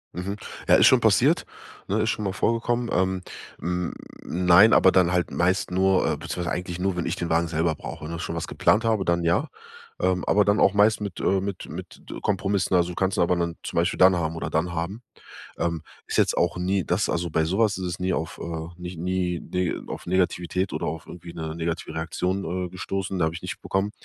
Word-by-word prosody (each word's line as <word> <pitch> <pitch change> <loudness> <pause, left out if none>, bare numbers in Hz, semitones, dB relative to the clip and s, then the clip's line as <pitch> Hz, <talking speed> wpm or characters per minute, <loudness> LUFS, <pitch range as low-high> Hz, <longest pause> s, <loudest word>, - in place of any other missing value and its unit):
Mhm. 95 +3 -3 0.3
Ja, - - +7
ist - - +7
schon - - +6
passiert, - - +3 0.4
ne, 105 +3 +1
ist 110 - +1
schon 105 -3 -2
mal 95 - -1
vorgekommen. 120 +2 0
Ähm, 95 0 +1 0.4
hm, 90 0 -2 0.3
nein, 90 +5 +5
aber 95 - +6
dann 90 -2 +4
halt 90 -1 0
meist 90 +1 +1
nur 95 0 +3
äh, - - 0
beziehungsweise 90 -2 -4
eigentlich 90 -1 -4
nur, 95 -1 -1
wenn 85 - -1
ich 85 - -1
den 85 -2 -4
Wagen 85 +1 +2
selber 80 0 0
brauche 80 +2 -8
und 80 - -5
auch 85 - -4
schon 85 - -4
was 85 - -3
geplant 110 +3 +2
habe, 110 -4 +1
dann 85 0 +1
ja. 85 - +2 0.5
Ähm, 90 0 +1
aber 105 0 +3
dann 105 +1 +3
auch 100 - +5
meist 105 +2 +4
mit, 100 -4 -5
äh, 95 0 +2
mit 100 -1 -5
mit - - -9 0.2
Kompromissen. 100 -1 0
Also, 90 0 +1
kannst 95 0 0
du - - +3
aber 90 +1 +3
dann 85 -1 -1
zum - - -6
Beispiel 85 +1 +1
dann 95 0 +7
haben 80 -1 -1
oder - - -4
dann 85 +2 -1
haben. 95 +8 -4 0.6
Ähm, 85 -2 -1 0.2
ist - - -2
jetzt - - +3
auch 85 0 +1
nie, 90 +1 0
dass 90 +4 0
also 85 0 -1
bei 80 +1 +1
so 95 +6 -1
was 110 -3 +4
ist 95 - -4
es 85 -1 -4
nie 95 0 0
auf, 80 -1 -3
äh, 80 -1 -5
nicht 90 0 -6
nie 90 0 -1
nie 90 -1 -2
auf - - -7
Negativität 90 0 0
oder - - -2
auf 80 0 -4
irgendwie 85 0 -10
'ne 80 0 -5
negative 85 0 -3
Reaktion, 90 +2 -2
äh, - - -7
gestoßen, 95 +1 -3
da 85 - +2
hab 80 - 0
ich 85 - -8
nicht 90 - -6
bekommen. 95 +2 -1
90 Hz, 225 wpm, -25 LUFS, 85-95 Hz, 0.6 s, Ja